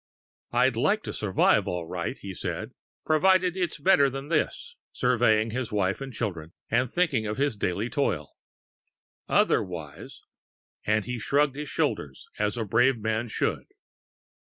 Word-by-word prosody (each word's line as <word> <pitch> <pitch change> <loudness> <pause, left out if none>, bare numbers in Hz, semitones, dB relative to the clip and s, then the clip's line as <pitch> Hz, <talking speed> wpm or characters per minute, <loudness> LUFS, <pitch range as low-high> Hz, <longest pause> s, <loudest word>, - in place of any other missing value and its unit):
"I'd - - +3
like 215 +2 +1
to - - -5
survive 100 -3 +2
all 90 -2 -3
right," 85 0 -4
he 100 -1 -7
said, - - -4 0.3
"provided 180 +3 +3
it's 180 -2 -2
better 150 -3 +4
than 135 +2 -7
this," 160 -2 -1 0.2
surveying 115 -3 +2
his 125 0 -3
wife 100 +1 0
and 135 -1 -5
children, 90 -8 -4 0.2
and 125 +2 +2
thinking 145 -11 +1
of 105 - -3
his 140 -3 +1
daily 100 +2 -1
toil. 105 - -1 1.0
"Otherwise 80 -6 -1 0.3
!" - - -65
and 110 -1 +2
he 125 -1 -4
shrugged 140 +4 +1
his 150 0 -5
shoulders 70 -2 -2
as 105 +2 0
a 115 - -1
brave 120 +5 +3
man 110 +2 -1
should. - - -2
115 Hz, 150 wpm, -27 LUFS, 100-140 Hz, 1.0 s, better